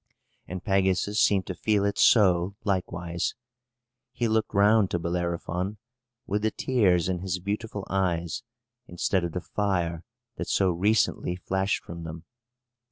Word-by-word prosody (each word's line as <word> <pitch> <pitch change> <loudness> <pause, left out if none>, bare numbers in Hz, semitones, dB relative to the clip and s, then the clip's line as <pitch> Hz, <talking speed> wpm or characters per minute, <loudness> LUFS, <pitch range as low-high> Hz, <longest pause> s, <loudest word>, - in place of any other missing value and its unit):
And 90 -1 -6
Pegasus 95 +1 +1
seemed 95 -2 +3
to 95 - -4
feel 100 +3 +1
it 100 0 -1
so, 95 -3 +4
likewise. 85 -3 -2 0.8
He 120 - -1
looked 110 0 +1
round 100 0 +4
to - - 0
Bellerophon, 85 +3 -2 0.5
with 105 +1 -1
the 110 - +2
tears 100 -9 +2
in 90 -1 -1
his 95 0 -2
beautiful 100 +2 -4
eyes, 90 +1 -1 0.5
instead 90 +1 0
of 85 -2 -3
the 90 - -3
fire 90 -5 -1 0.3
that - - -4
so 95 -2 +2
recently 90 0 +1
flashed 95 +2 -1
from 85 0 -8
them. 80 0 -7
95 Hz, 140 wpm, -27 LUFS, 85-100 Hz, 0.8 s, so